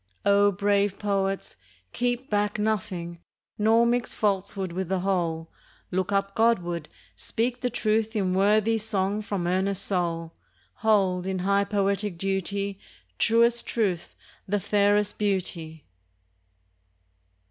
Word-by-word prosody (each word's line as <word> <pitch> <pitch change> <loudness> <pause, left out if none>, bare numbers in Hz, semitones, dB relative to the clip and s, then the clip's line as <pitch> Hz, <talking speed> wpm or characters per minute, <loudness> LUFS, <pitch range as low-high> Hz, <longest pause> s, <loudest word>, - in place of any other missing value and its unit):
O 200 0 +5
brave 200 0 +1
poets, 195 -1 -1 0.4
keep 245 +1 -1
back 205 -1 0
nothing; 185 -5 -2 0.4
Nor 225 +2 +4
mix 240 +1 0
falsehood 195 -2 -1
with 180 0 -3
the 190 -1 0
whole! 170 -4 -1 0.4
Look 185 +1 -1
up 195 0 0
Godward! 175 -9 +1 0.3
speak 240 +2 -2
the 250 - 0
truth 220 -1 0
in 190 -3 +1
Worthy 210 +3 +3
song 205 -1 -1
from 200 -4 -3
earnest 190 +2 0
soul! 165 -3 -2 0.4
Hold, 190 -4 +2
in 190 0 -1
high 200 0 +3
poetic 200 -2 -1
duty, 195 +1 -2 0.4
Truest 235 +1 +3
Truth 195 -7 -1 0.3
the 205 +2 +1
fairest 205 +1 +2
Beauty! 170 -6 -2
200 Hz, 115 wpm, -26 LUFS, 185-215 Hz, 0.4 s, O